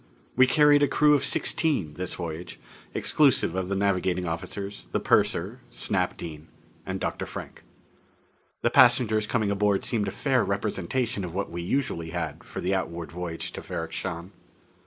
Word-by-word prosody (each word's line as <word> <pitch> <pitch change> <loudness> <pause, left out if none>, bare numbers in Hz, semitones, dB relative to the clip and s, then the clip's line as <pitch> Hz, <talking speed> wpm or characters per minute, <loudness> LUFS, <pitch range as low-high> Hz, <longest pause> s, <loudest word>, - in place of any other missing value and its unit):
We 130 +1 +6
carried 145 +3 +5
a 145 - +5
crew 150 +2 +4
of 140 -2 +3
sixteen, 140 - 0
this 90 +4 -4
voyage, 85 0 -6 0.3
exclusive 140 - +3
of 95 0 -2
the 100 - 0
navigating 95 -2 +1
officers, 100 +5 -5
the - - +1
purser, - - +1
Snap - - -1
Dean, 80 -2 -8 0.4
and - - -3
Dr. - - -3
Frank. - - -8 1.0
The 120 - +3
passengers 120 -5 +5
coming 110 -4 +1
aboard 100 -1 +1
seemed 110 -4 0
a - - -1
fair 130 0 +1
representation 100 +3 -1
of 90 -1 -6
what 100 - -2
we 85 +1 -4
usually 85 -5 -1
had 80 -3 -4
for - - -7
the 95 - 0
outward 85 -3 -3
voyage 85 -1 -5
to - - -7
Ferrok - - -5
Shahn. 90 0 -5
100 Hz, 160 wpm, -27 LUFS, 85-120 Hz, 1.0 s, We